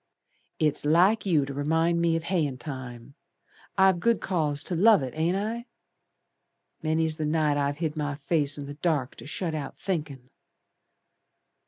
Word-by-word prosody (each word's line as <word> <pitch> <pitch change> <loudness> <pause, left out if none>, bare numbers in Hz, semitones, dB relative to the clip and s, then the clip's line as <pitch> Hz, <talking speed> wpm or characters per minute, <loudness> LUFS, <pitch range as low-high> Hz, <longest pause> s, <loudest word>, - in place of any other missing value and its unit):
"It's 150 -2 +1
like 180 +8 +3
you 155 -6 +3
to 140 - -6
remind 160 +4 +1
me 165 -1 +2
o' - - -3
hayin' 160 -7 -1
time. 130 -2 -8 0.6
I've 190 -2 +5
good 230 +4 +2
cause 155 -6 -1
to 180 - -3
love 205 -2 +5
it, 130 - -5
ain't 165 +3 +1
I? 230 +4 -3 1.1
Many's 160 0 0
the 155 - -2
night 155 -1 +2
I've 145 0 0
hid 160 -2 -2
my 145 -2 -2
face 145 0 0
in 145 - -6
the 145 - -7
dark 145 -4 -1
To - - -10
shut 165 +2 -3
out 150 -2 -5
thinkin'!" 145 -9 -4
155 Hz, 160 wpm, -27 LUFS, 145-170 Hz, 1.1 s, I've